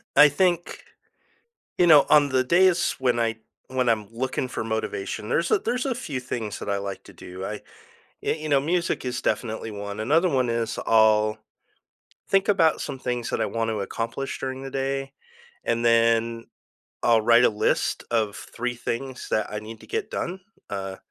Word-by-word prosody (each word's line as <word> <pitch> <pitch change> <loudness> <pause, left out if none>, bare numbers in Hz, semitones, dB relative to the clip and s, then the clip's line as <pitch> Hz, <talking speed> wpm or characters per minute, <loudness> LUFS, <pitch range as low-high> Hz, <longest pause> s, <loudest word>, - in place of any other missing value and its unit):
I 150 - +9
think 175 +3 0 0.9
you 175 - +4
know, 150 -4 +8
on 145 -1 +6
the 130 -1 +2
days 175 +4 +3
when 125 -2 +1
I 115 -1 0 0.3
when 130 -1 0
I'm 110 -3 +1
looking 130 +2 -2
for 125 - -4
motivation, 110 -1 -3
there's 165 +5 +1
a - - +4
there's 250 +5 -2
a 260 -3 0
few 155 - -4
things 115 -4 -5
that - - -5
I 100 - +1
like 100 -1 -5
to - - -14
do. 90 +1 -9
I, 105 +1 -5 0.6
y - - 0
you 155 0 -5
know, 140 -2 +4
music 170 +1 -1
is 125 -1 -3
definitely 110 -1 -2
one. 100 0 -6
Another 160 +11 +3
one 130 -5 +1
is 115 -1 -1
I'll 110 -1 +4 0.9
think 195 0 +3
about 165 -6 +3
some 135 -2 -5
things 125 -2 -3
that - - -1
I - - +2
wanna 115 -1 -2
accomplish 115 +6 -4
during 130 0 -4
the 135 - -7
day, 135 0 -2 0.5
and 115 0 0
then 115 0 +3 0.6
I'll 115 -1 +4
write 120 +2 +6
a - - +7
list 105 - 0
of 110 -3 0
3 125 +1 -4
things 125 +2 -5
that 110 - +1
I 105 - -2
need 110 +1 -10
to - - -14
get 445 -1 -3
done. 185 +2 -4 0.3
Uh 95 -1 -4
120 Hz, 180 wpm, -25 LUFS, 110-145 Hz, 0.9 s, I